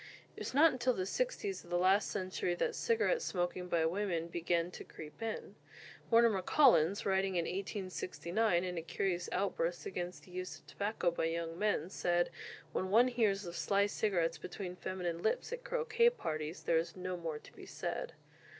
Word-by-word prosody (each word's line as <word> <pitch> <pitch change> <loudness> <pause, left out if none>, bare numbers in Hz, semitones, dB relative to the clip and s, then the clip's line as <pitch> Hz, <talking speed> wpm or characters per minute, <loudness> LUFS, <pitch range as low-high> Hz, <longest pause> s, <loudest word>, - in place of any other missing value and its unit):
It - - -10
was - - -4
not 315 +3 +7
until 255 -1 +1
the 185 - -1
'sixties 425 - -2
of 175 - -16
the 175 - +1
last 190 +3 +4
century 185 -1 -1
that - - 0
cigarette 465 +1 +2
smoking 180 - -2
by 165 -2 +2
women 170 -1 -1
began 170 0 0
to - - -8
creep 150 +5 -11
in. 225 -1 -4 0.6
Mortimer 230 -4 +5
Collins, 200 - +5
writing 190 -1 +1
in 170 -1 +1
1869, 185 0 -1
in 180 -2 -2
a - - -4
curious 175 +1 -1
outburst 175 -2 -1
against 180 -1 -4
the 180 - -16
use 185 0 -5
of - - -22
tobacco 200 -4 -1
by 165 - -1
young 165 0 -2
men, 205 -5 +1
said, 175 -2 +1 0.4
"When 185 - -1
one 235 +5 +6
hears 210 -5 +1
of 170 0 -6
sly 200 +3 +2
cigarettes 175 -6 0
between 180 +2 -6
feminine 180 -2 -3
lips 220 - 0
at - - -5
croquet 470 -1 +3
parties, 155 - -4
there 165 - +3
is 165 0 -4
no 185 0 -3
more 165 -3 -4
to - - -15
be - - -12
said." - - -4
185 Hz, 180 wpm, -34 LUFS, 170-215 Hz, 0.6 s, not